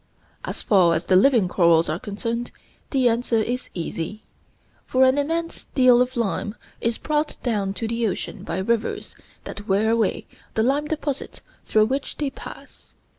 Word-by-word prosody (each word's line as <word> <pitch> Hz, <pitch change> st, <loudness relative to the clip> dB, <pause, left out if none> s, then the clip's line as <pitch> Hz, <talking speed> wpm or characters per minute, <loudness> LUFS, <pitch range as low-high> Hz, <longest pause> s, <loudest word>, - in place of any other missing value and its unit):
As -, -, -5 dB
far 180 Hz, -5 st, +4 dB
as 160 Hz, -, -2 dB
the 185 Hz, -, +3 dB
living 225 Hz, 0 st, +5 dB
corals 170 Hz, -2 st, +4 dB
are 155 Hz, +2 st, -2 dB
concerned 230 Hz, +2 st, -4 dB, 0.4 s
the 265 Hz, -3 st, +3 dB
answer 235 Hz, 0 st, +1 dB
is 245 Hz, +3 st, -1 dB
easy, 170 Hz, +4 st, -4 dB, 0.6 s
for 260 Hz, 0 st, +2 dB
an 260 Hz, +2 st, +4 dB
immense 330 Hz, +3 st, -2 dB
deal 255 Hz, -2 st, +6 dB
of 250 Hz, 0 st, -1 dB
lime 210 Hz, -1 st, -1 dB, 0.2 s
is 230 Hz, 0 st, -1 dB
brought 300 Hz, 0 st, -1 dB
down 205 Hz, -5 st, -1 dB
to 225 Hz, +4 st, -3 dB
the 230 Hz, 0 st, 0 dB
ocean 195 Hz, -, -4 dB
by -, -, -3 dB
rivers 220 Hz, +4 st, -1 dB, 0.3 s
that 205 Hz, +1 st, -8 dB
wear 205 Hz, +3 st, +2 dB
away 230 Hz, -3 st, +1 dB, 0.3 s
the 220 Hz, -, +2 dB
lime 280 Hz, +5 st, +1 dB
deposits 295 Hz, -3 st, -4 dB, 0.3 s
through 215 Hz, 0 st, +4 dB
which 270 Hz, +4 st, -3 dB
they 290 Hz, -2 st, -1 dB
pass. -, -, -12 dB
230 Hz, 165 wpm, -23 LUFS, 200-260 Hz, 0.6 s, deal